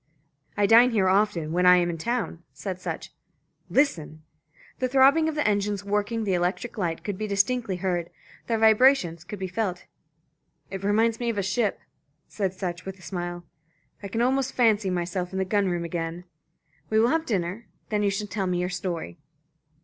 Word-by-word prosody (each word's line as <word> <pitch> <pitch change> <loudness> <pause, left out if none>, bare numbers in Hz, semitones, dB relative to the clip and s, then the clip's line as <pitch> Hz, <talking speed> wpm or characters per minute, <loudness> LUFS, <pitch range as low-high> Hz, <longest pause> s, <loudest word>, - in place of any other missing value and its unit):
"I 205 - +3
dine 230 +4 +7
here 210 -6 +2
often 185 -5 +1
when 180 +2 +2
I 180 0 +8
am 175 -1 +2
in 165 - -6
town," 230 -4 -2
said 185 -2 -6
Sutch. - - -5 0.6
"Listen!" 160 - 0 0.6
The 255 - +1
throbbing 275 +5 +5
of 315 - -4
the 300 - +1
engines 205 -1 0
working 210 +2 -1
the 195 -3 0
electric 180 +7 -1
light 170 -5 -2
could 200 -3 -4
be 215 - -2
distinctly 205 +1 0
heard, 175 -2 -2 0.4
their 230 - +1
vibrations 220 - +4
could 205 +4 -7
be 190 0 -4
felt. 185 -1 -3 0.9
"It 195 0 -5
reminds 220 +3 +2
me 240 -1 -1
of 225 - -2
a 200 - 0
ship," 205 +2 0 0.5
said 190 -3 -3
Sutch, 180 -1 -4
with 190 0 -7
a 185 - -17
smile. 175 0 -5 0.6
"I 200 - -5
can 225 +4 -1
almost 265 +1 +1
fancy 215 -5 +3
myself 180 +1 -2
in - - -3
the 190 - 0
gun 200 0 +1
room 175 -1 -2
again. 170 +1 -4 0.7
We 220 - +3
will 230 +2 +4
have 325 +2 0
dinner. 195 +1 -2 0.2
Then 210 -1 0
you 205 - +2
shall 200 +2 -2
tell 200 -2 -3
me 180 -1 0
your 180 0 -1
story." 180 -2 -4
195 Hz, 190 wpm, -26 LUFS, 180-225 Hz, 0.9 s, I